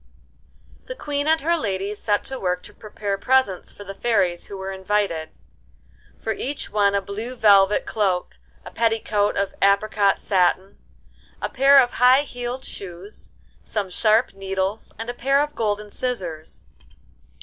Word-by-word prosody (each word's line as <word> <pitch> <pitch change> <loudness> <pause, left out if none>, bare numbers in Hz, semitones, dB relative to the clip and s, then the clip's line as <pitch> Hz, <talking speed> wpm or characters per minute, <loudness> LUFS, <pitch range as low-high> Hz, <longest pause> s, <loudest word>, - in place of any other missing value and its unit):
The - - -5
Queen 290 -8 -2
and 320 0 +3
her 335 +4 +2
ladies 200 - -3
set 205 -1 0
to 265 -1 -6
work 180 -1 -1
to - - -12
prepare 205 -2 -5
presents 255 -7 +1
for 205 - -11
the 195 0 -7
fairies 190 -6 0
who 200 - -8
were 190 0 -5
invited: 190 -4 -1 0.9
for 220 - -2
each 280 +5 -4
one 200 -1 +2
a 200 - +1
blue 215 +6 -6
velvet 205 -3 +5
cloak, 185 - -1 0.3
a - - -9
petticoat 220 -3 0
of 200 0 -1
apricot 200 0 +3
satin, 190 0 0 0.6
a - - -3
pair 275 +1 +5
of 245 -2 +5
high 255 +2 +5
heeled 245 -1 -6
shoes, 190 +2 -10 0.3
some 200 -4 -3
sharp 220 +5 +2
needles, 195 +1 -3
and 225 +1 -6
a 245 - -3
pair 275 +3 +2
of 295 +1 -1
golden 210 -3 -2
scissors. 180 -12 -5
210 Hz, 150 wpm, -23 LUFS, 195-245 Hz, 0.9 s, velvet